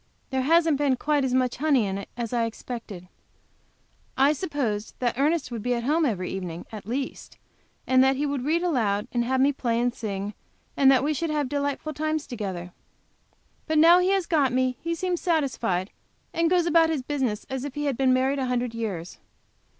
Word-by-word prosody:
There 265 0 +1
hasn't 320 +1 +3
been 280 -3 +2
quite 290 +2 0
as 255 -1 0
much 255 -1 +1
honey 280 -5 +2
in 195 0 -3
it 200 - -9
as 235 -1 -4
I 235 -1 +2
expected. 225 -5 -7 1.1
I 275 +3 +5
supposed 270 - -3
that 245 -2 0
Ernest 290 +1 +1
would 230 -2 -4
be 245 +2 0
at 235 - -3
home 310 +5 +2
every 185 -6 -2
evening, 175 -3 -5
at 215 -2 -9
least, 265 +4 -5 0.5
and 260 0 +5
that 265 0 +3
he 290 +3 -1
would 280 -3 -2
read 325 +5 +1
aloud, 220 - 0
and 240 -1 0
have 260 +2 0
me 280 +2 +4
play 235 -3 -1
and 245 0 +1
sing, 200 -3 -4 0.4
and 270 -1 +5
that 265 -1 +5
we 300 +2 +1
should 330 +2 -2
have 300 -2 0
delightful 285 +1 -2
times 310 +1 -2
together. 190 -7 -5 0.9
But 315 -1 +1
now 335 +3 +7
he 365 +1 +2
has 390 -2 +2
got 295 -6 +2
me 255 0 +1
he 335 0 -2
seems 355 0 -2
satisfied, 245 - 0 0.4
and 335 0 +2
goes 355 -1 +3
about 330 -1 +4
his 305 -5 -1
business 255 -7 -2
as 265 -1 -4
if 285 -2 -6
he 295 0 -2
had 280 -3 0
been 260 +1 +2
married 260 +2 +2
a 260 - -1
hundred 245 -1 -1
years. 195 -7 -5
265 Hz, 205 wpm, -25 LUFS, 230-300 Hz, 1.1 s, now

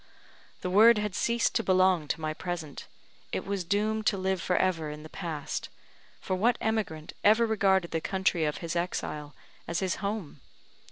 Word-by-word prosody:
the 180 - -2
word 220 +4 +7
had 210 -2 -2
ceased 235 +3 +1
to 230 - +2
belong 185 -5 +3
to 155 - -2
my 155 -1 -2
present 165 -4 -6 0.4
it - - -3
was 200 -2 -2
doomed 215 +4 0
to 205 - +2
live 190 -1 -1
for 180 - 0
ever 165 -5 +1
in 150 0 -8
the 155 - -10
past; 165 -6 -4 0.5
for 185 - -2
what 230 +6 +2
emigrant 200 -9 -2
ever 220 +3 +5
regarded 195 -5 +2
the 165 - -1
country 190 -3 0
of 150 -1 0
his 165 - -3
exile 150 -4 -3 0.3
as 170 - -2
his 190 -2 -1
home? 200 -8 -4
185 Hz, 175 wpm, -29 LUFS, 160-210 Hz, 0.5 s, word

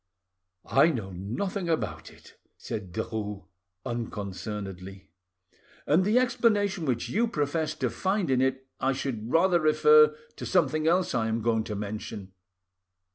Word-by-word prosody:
"I 140 +4 +5
know 110 -11 -3
nothing 170 - -3
about 160 - -2
it," - - -17 0.2
said 95 -4 -6
Derues 105 -1 -4 0.4
unconcernedly, 100 - -6 0.7
"and 160 +5 +3
the 210 +5 +2
explanation 205 -7 +2
which 120 -3 -1
you 235 +3 +1
profess 155 -3 -1
to - - -1
find 190 -5 0
in 130 -1 +3
it 130 0 0
I 135 +1 +1
should 125 -4 -4
rather 175 +1 +4
refer 455 - +5 0.2
to - - -6
something 155 0 +2
else 180 +2 +2
I 115 -3 +1
am 110 0 -1
going 115 -1 +1
to 105 - -4
mention. 105 -1 -6
130 Hz, 135 wpm, -27 LUFS, 105-175 Hz, 0.7 s, I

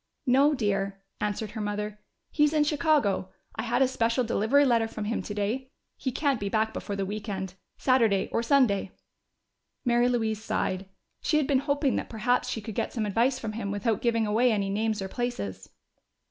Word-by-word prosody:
"No, 275 +4 +4
dear," 200 -4 -1 0.2
answered 210 0 -2
her 220 - -5
mother. 210 0 -3 0.3
"He's 295 0 +3
in 305 -1 +4
Chicago 295 - +2 0.3
I - - -2
had - - +2
a - - +4
special 235 0 +1
delivery 240 +5 +3
letter 230 -3 +3
from 215 -1 -5
him 230 +2 -1
today. 210 +6 -3 0.3
He 260 - -3
can't 280 -1 +1
be 200 - -2
back 220 +1 +1
before 200 - -4
the 195 -1 -1
weekend 195 -2 -4 0.2
Saturday 230 -7 +3
or - - +1
Sunday." 235 -7 +2 0.9
Mary 240 0 +3
Louise 220 -3 -1
sighed. 190 -2 -2 0.3
She 305 - +2
had 300 - +2
been 265 -1 +3
hoping 285 0 +1
that - - -4
perhaps 240 +3 0
she 225 - -3
could 220 +1 -6
get - - -2
some 225 -3 -1
advice 235 +6 +2
from 225 -4 -4
him 215 -2 -4
without 205 +1 0
giving 230 -2 +2
away 230 +4 +3
any 200 -2 0
names 215 0 0
or - - -3
places. 100 - -4
225 Hz, 185 wpm, -28 LUFS, 205-255 Hz, 0.9 s, No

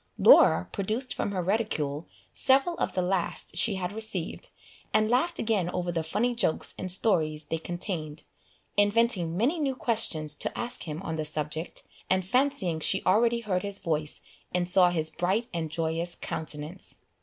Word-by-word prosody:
Laura 85 - +6
produced 215 +6 -2
from - - -2
her 185 -3 -2
reticule 170 -7 -1 0.3
several 275 +6 +3
of - - -1
the 185 - +1
last 180 -2 -2
she 200 +4 +4
had 185 +1 -3
received, 220 - -3 0.4
and 215 +1 +2
laughed 335 +8 +2
again 210 -6 0
over 180 -1 -2
the 165 -1 -1
funny 215 +10 0
jokes 230 -9 0
and 185 - +1
stories 160 -6 +2
they 160 +2 -3
contained, 165 -3 -4 0.5
inventing 205 -5 +2
many 275 - +1
new 275 -3 0
questions 180 - -1
to - - -4
ask 245 -5 -3
him 155 +4 -5
on 160 -3 -3
the 155 - -1
subject, 155 +2 -3 0.3
and 185 -1 +2
fancying 245 - +1
she 190 +5 +2
already 230 +5 +3
heard 190 -5 -1
his 200 0 -4
voice, 155 -4 -3 0.3
and 175 0 0
saw 180 0 +5
his 160 -2 -1
bright 195 +7 0
and 165 -2 -2
joyous 165 +2 -2
countenance. 155 +3 -5
185 Hz, 165 wpm, -28 LUFS, 160-220 Hz, 0.5 s, Laura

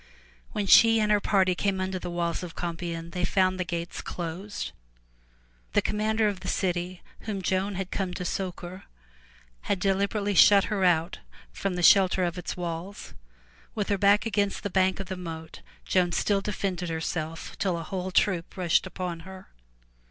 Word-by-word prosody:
When 205 - -1
she 225 +3 +7
and 210 -1 +2
her 210 - +5
party 190 -2 +2
came 195 +1 -1
under 185 0 -2
the 175 - -5
walls 175 0 -2
of 180 -2 -7
Compiegne, 170 -1 -4
they 180 0 -3
found 185 0 +2
the - - +1
gates 170 0 -4
closed. 180 +4 -5 1.0
The - - +4
com - - -2
mander 215 +1 +2
of 200 -3 -2
the - - -8
city 180 -1 -2 0.2
whom 200 -3 -3
Joan 190 +2 0
had 190 0 -4
come 190 -2 -2
to 180 - -4
succor, 185 0 -5 0.8
had 200 - +1
deliberately 200 +2 0
shut 200 +1 +7
her 195 -2 0
out 170 -1 +2 0.3
from 195 -2 -2
the 175 - -2
shelter 190 0 +6
of 175 -1 -1
its 180 - -5
walls. 175 +3 -5 0.6
With 210 -3 -2
her 200 - +2
back 200 +2 +4
against 205 -3 0
the 205 - -3
bank 190 0 +2
of 195 - -4
the 190 - -5
moat, 165 -3 -8 0.2
Joan 180 -2 +2
still 200 -2 +1
defended 190 -3 -3
herself 160 0 -4
till 185 -5 0
a 165 - -5
whole 185 +2 -4
troop 185 -2 +1
rushed 180 0 +2
upon 180 -3 -4
her. 190 +2 -11
185 Hz, 175 wpm, -27 LUFS, 175-200 Hz, 1.0 s, she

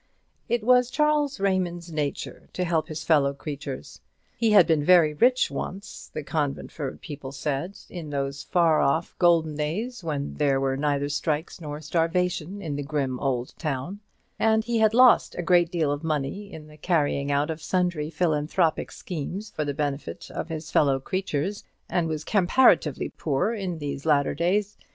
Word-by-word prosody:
It 235 -1 +1
was 250 +1 +4
Charles 295 -1 +1
Raymond's 180 -3 -1
nature 150 -3 -4
to 180 - -1
help 170 -3 0
his 155 -1 -5
fellow 140 -4 +3
creatures. 140 -2 -7 0.3
He 230 - +1
had 205 -5 +7
been 160 -3 +2
very 165 -2 +5
rich 250 +10 +3
once, 195 +2 -6
the 155 - -5
Conventford 145 -1 -3
people 145 -4 -7
said, 145 +6 -3
in 170 -4 -7
those 140 -1 -3
far 165 -3 +3
off 150 +5 0
golden 165 -3 +3
days 210 +10 -3
when 145 -3 -3
there 140 -2 +2
were 135 0 0
neither 145 0 0
strikes 150 +3 -2
nor 150 -1 -6
starvation 180 +4 -1
in 150 -4 -3
the - - -2
grim 140 -3 -2
old 125 -3 -2
town; 155 +6 -3 0.4
and 220 0 +3
he 235 -1 0
had 220 0 +4
lost 250 -1 +6
a 175 - -3
great 175 -1 +4
deal 160 -5 +1
of 145 +2 -3
money 160 +6 -2
in 155 -4 -9
the 150 0 -15
carrying 145 -4 0
out 145 +2 +1
of 160 0 -6
sundry 175 -5 0
philanthropic 160 0 0
schemes 185 +5 -6
for 155 - -2
the 145 - -2
benefit 145 -1 -4
of - - -5
his 160 -1 -6
fellow 135 -2 +3
creatures, 185 +3 -2 0.2
and 175 -2 0
was 155 -1 -3
comparatively 200 +8 +3
poor 150 +9 -1
in 190 -6 -3
these 145 -2 -5
latter 145 -2 +3
days. 195 +6 0
160 Hz, 170 wpm, -26 LUFS, 145-185 Hz, 0.4 s, had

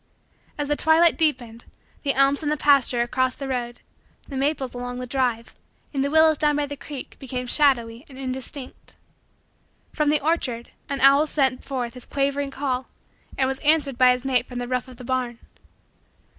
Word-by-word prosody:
As 290 -1 -2
the 295 - +1
twilight 320 +2 +4
deepened, 240 -8 -1 0.4
the 275 -2 0
elms 275 +2 +3
in 300 - -1
the 300 - 0
pasture 275 -4 +3
across 255 +1 0
the 275 - -6
road, 240 -2 -4 0.5
the 275 - -8
maples 270 -1 -1
along 245 0 -5
the 250 - -4
drive, 245 -3 -1 0.4
and 270 -1 0
the 280 - 0
willows 315 0 +4
down 295 -1 +2
by 295 0 0
the 285 0 -6
creek, 280 0 -9
became 250 -1 -5
shadowy 240 -4 +1
and 265 - -12
indistinct. 265 +1 -6 1.0
From 300 -1 +1
the 300 0 +3
orchard, 270 -7 -1 0.2
an 280 -1 -3
owl 275 +3 +6
sent 265 -4 0
forth 250 -4 -4
his 250 -1 -11
quavering 280 0 -1
call 265 -2 -3 0.5
and 265 - +2
was 265 0 -3
answered 290 -4 +2
by 255 -1 +7
his 250 +1 -2
mate 255 -2 +1
from 245 - -8
the 245 0 -3
roof 250 0 -2
of 255 -2 -13
the 250 - -10
barn. 250 -1 -2
265 Hz, 185 wpm, -24 LUFS, 250-285 Hz, 1.0 s, by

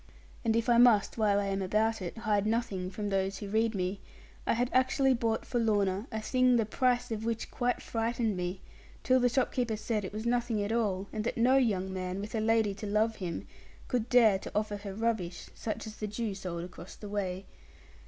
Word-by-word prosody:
And 225 -2 +2
if 230 0 +1
I 235 -1 +5
must 230 -2 +5
while 205 -2 +3
I 200 - -1
am 195 0 -1
about 215 +3 +1
it, 180 +4 -5
hide 210 -2 +1
nothing 210 -5 -1
from 205 +2 -4
those 195 0 0
who 205 - -6
read 220 +2 +1
me, 185 +1 -2 0.5
I - - +4
had 245 +2 0
actually 260 +1 +3
bought 230 -2 -1
for 245 - -1
Lorna 205 -1 +1
a 220 - -2
thing 255 +3 +3
the 230 -2 +3
price 245 +2 +1
of 220 -1 -3
which 230 0 -3
quite 245 0 -1
frightened 225 -1 -1
me, 180 +1 -3 0.4
till 255 0 +4
the 245 0 +3
shopkeeper 245 -3 0
said 215 0 -2
it 190 - -5
was 215 +2 -5
nothing 235 -3 +1
at 205 - -2
all, 200 -4 0
and 215 - -2
that 235 - -2
no 250 +3 +4
young 190 -7 +1
man, 185 0 -3
with 210 +3 -6
a 225 - 0
lady 220 -2 +2
to 205 +2 -6
love 215 +2 +1
him, 175 -3 -4 0.4
could 245 -2 -1
dare 225 -6 +5
to - - -8
offer 210 0 0
her 200 -1 -7
rubbish, 210 -6 -2
such 215 - -4
as 215 0 -9
the 215 - -3
Jew 210 0 -3
sold 180 -3 -5
across 175 0 -10
the 210 - -9
way. 195 -2 -3
215 Hz, 215 wpm, -30 LUFS, 195-230 Hz, 0.5 s, I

